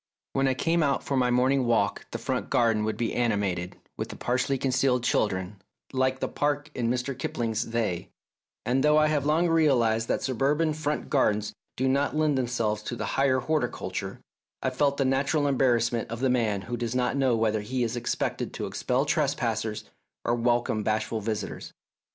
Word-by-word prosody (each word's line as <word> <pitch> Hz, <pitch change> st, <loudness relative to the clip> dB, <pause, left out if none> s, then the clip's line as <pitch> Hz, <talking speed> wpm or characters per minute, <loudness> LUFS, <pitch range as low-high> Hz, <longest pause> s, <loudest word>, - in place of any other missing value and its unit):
When 135 Hz, 0 st, +2 dB
I 130 Hz, -, +1 dB
came 165 Hz, +4 st, +1 dB
out 140 Hz, -3 st, +1 dB
for 140 Hz, -, -2 dB
my 125 Hz, -2 st, +2 dB
morning 130 Hz, +1 st, +2 dB
walk 110 Hz, -4 st, +1 dB
the -, -, -4 dB
front 125 Hz, +2 st, -3 dB
garden 115 Hz, -5 st, +2 dB
would 110 Hz, -, -2 dB
be 115 Hz, -2 st, -1 dB
animated 100 Hz, -7 st, -1 dB, 0.2 s
with -, -, -5 dB
partially 125 Hz, +2 st, 0 dB
concealed 130 Hz, -1 st, +1 dB
children 95 Hz, -4 st, 0 dB, 0.3 s
like 130 Hz, 0 st, +1 dB
the -, -, -1 dB
park 145 Hz, +1 st, -1 dB
in 120 Hz, -2 st, -1 dB
Mr. 125 Hz, +2 st, -1 dB
Kipling's 115 Hz, -3 st, -2 dB
"They," 110 Hz, -7 st, -2 dB, 0.6 s
and 130 Hz, +2 st, +1 dB
though 150 Hz, 0 st, +5 dB
I 155 Hz, -, +5 dB
have 145 Hz, -2 st, 0 dB
long 160 Hz, +3 st, +3 dB
realised 120 Hz, -9 st, +3 dB
that -, -, -1 dB
suburban 145 Hz, +5 st, +1 dB
front 150 Hz, -1 st, -3 dB
gardens 105 Hz, -7 st, +1 dB, 0.2 s
do 130 Hz, -, +1 dB
not 140 Hz, +3 st, +1 dB
lend 155 Hz, -2 st, +2 dB
themselves 115 Hz, -4 st, 0 dB
to 120 Hz, -, -5 dB
the -, -, -3 dB
higher 135 Hz, -1 st, +2 dB
horticulture, 155 Hz, +3 st, -2 dB, 0.4 s
I 130 Hz, -, +1 dB
felt 140 Hz, +1 st, +1 dB
the 135 Hz, -, +1 dB
natural 140 Hz, +3 st, +1 dB
embarrassment 120 Hz, -4 st, +1 dB
of 115 Hz, +1 st, -5 dB
the 130 Hz, 0 st, +2 dB
man 110 Hz, -5 st, +1 dB
who 120 Hz, 0 st, -4 dB
does 120 Hz, 0 st, -3 dB
not 125 Hz, +1 st, +1 dB
know 135 Hz, -3 st, +2 dB
whether 110 Hz, -1 st, +1 dB
he 125 Hz, +4 st, -2 dB
is 115 Hz, +1 st, -2 dB
expected 120 Hz, -, -2 dB
to -, -, -3 dB
expel -, -, 0 dB
trespassers -, -, -1 dB, 0.4 s
or 120 Hz, -, +2 dB
welcome 120 Hz, -2 st, +1 dB
bashful 110 Hz, +1 st, -1 dB
visi 105 Hz, -1 st, -2 dB
tors. -, -, -9 dB
125 Hz, 180 wpm, -27 LUFS, 115-140 Hz, 0.6 s, though